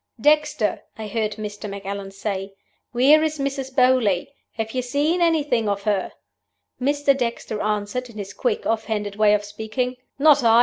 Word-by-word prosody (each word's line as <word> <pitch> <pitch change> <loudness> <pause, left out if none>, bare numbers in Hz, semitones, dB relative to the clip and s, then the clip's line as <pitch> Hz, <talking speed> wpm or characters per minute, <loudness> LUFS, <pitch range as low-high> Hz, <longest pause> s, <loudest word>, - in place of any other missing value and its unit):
"'Dexter!' 300 -4 +2 0.2
I 220 - -5
heard 215 0 -1
Mr. 210 -1 -6
Macallan 200 0 -5
say. 195 0 -4 0.4
'Where 275 +5 +5
is 310 -1 0
Mrs. 275 -1 -3
Beauly? 250 -8 +3 0.2
Have 225 -1 -3
you 255 - -1
seen 290 +8 0
anything 295 -10 +2
of 200 0 -2
her?' 200 -3 0 0.7
"Mr. 285 +1 +2
Dexter 235 -4 -3
answered, 210 +4 -2
in 220 - -12
his 200 -1 -6
quick, 465 -2 -1
off 225 -1 0
hand 205 -2 -3
way 210 -1 +5
of 205 0 -2
speaking, 220 +4 -3 0.2
'Not 285 -1 +5
I. 230 0 +6
225 Hz, 165 wpm, -23 LUFS, 210-275 Hz, 0.7 s, I